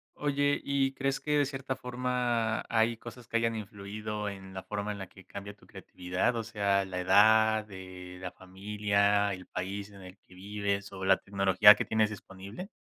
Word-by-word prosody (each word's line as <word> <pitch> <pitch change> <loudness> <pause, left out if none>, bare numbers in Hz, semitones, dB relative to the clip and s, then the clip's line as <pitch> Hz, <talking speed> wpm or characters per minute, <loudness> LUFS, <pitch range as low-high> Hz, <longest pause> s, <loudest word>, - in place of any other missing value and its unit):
Oye, 145 0 +1
¿y 135 -1 +1
crees 135 0 -1
que 150 0 0
de 145 - +3
cierta 135 -1 -4
forma, 125 -3 -1
hay 115 0 +2
cosas 120 0 -11
que 115 - 0
hayan 115 0 +1
influido 105 0 -5
en 95 -1 -9
la 95 - -5
forma 105 0 -3
en 105 - -5
la 95 - -6
que 95 +1 -17
cambia 100 +1 -8
tu 100 - -22
creatividad? 90 +6 -2
O 115 - -2
sea, 100 -3 +1
la 90 -1 -4
edad, 110 +3 +5
eh, 95 -1 -9
la 90 -1 -5
familia, 100 +1 0
el 90 0 -8
país 100 +2 -5
en 100 -1 -13
el 90 +1 -12
que 90 - -22
vives, 100 +1 -3
¿o 95 -1 -6
la 95 0 +5
tecnología 100 +1 +6
que - - -2
tienes 110 -1 +2
disponible? 100 - -9
105 Hz, 185 wpm, -30 LUFS, 95-115 Hz, -, tecnología